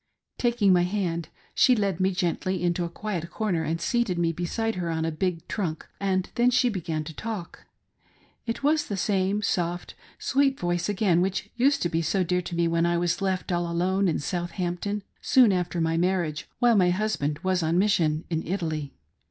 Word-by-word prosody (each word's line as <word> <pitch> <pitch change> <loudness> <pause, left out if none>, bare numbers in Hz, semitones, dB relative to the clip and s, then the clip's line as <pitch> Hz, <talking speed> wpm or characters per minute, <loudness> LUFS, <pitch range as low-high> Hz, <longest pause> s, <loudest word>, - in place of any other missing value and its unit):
Taking 235 -5 +3
my 175 - +4
hand 175 -3 -1 0.2
she 255 - +5
led 200 -5 0
me 190 0 +3
gently 180 0 -1
into 175 0 +1
a - - -4
quiet 175 -3 -4
corner 195 -7 -1
and 160 +1 -2
seated 220 0 0
me 170 -1 +2
beside 200 +7 -2
her 175 -3 -3
upon 160 -1 -1
a 165 - -1
big 165 0 -2
trunk, 165 -6 -3
and 190 -2 0
then 240 +1 +3
she 250 0 +3
began 165 -7 -3
to 160 +1 -8
talk. 210 0 -6 0.8
It 230 +4 -3
was 300 +1 +2
the 200 - -3
same 195 +1 0
soft 175 -2 -1 0.2
sweet 275 0 +1
voice 175 +1 -1
again, 190 -4 +2
which 190 +1 -2
used 270 +4 +3
to 175 - +1
be 165 0 0
so 185 +3 +1
dear 180 +1 0
to 170 - -6
me 170 0 +2
when 170 0 +2
I 170 0 +1
was 175 +1 0
left 190 -1 -1
all 175 -1 0
alone 185 +3 +1
in 165 - +1
Southampton, 175 +5 -3 0.2
soon 250 -5 +5
after 180 -1 -1
my 165 0 +1
marriage, 175 -4 0
while 240 -2 +4
my 180 -3 +4
husband 180 -7 0
was 185 -1 +1
on 165 +1 +1
mission 170 -6 +2
in 160 -1 0
Italy. 160 -6 -3
180 Hz, 195 wpm, -26 LUFS, 170-205 Hz, 0.8 s, she